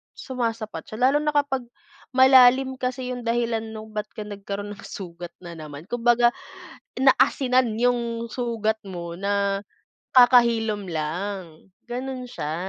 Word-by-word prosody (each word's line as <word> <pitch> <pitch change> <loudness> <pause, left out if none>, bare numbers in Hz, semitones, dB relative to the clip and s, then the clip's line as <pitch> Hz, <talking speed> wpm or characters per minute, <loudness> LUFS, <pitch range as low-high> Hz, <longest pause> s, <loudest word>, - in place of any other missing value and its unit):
sumasapat 225 - -4
siya. 215 - -8
Lalo 295 - +2
na 300 0 -1
kapag 270 -4 0 0.5
malalim 260 0 +6
kasi 255 0 -3
yung 245 -2 -6
dahilan 230 -1 +1
'no, 220 0 -9
ba't 210 -1 -4
ka 215 - -5
nagkaroon 205 0 -6
ng 205 - -13
sugat 175 -2 -8
na 175 - -8
naman, 150 -1 -9
kumbaga 240 0 +4 0.7
naasinan 260 -3 +3
yung 235 -1 0
sugat 225 -3 -1
mo, 170 -2 -6
na 200 0 0 0.5
kakahilom 235 -5 +5
lang, 170 +2 -5 0.2
gano'n 255 +1 -4
siya. 155 -9 -4
230 Hz, 130 wpm, -24 LUFS, 200-250 Hz, 0.7 s, malalim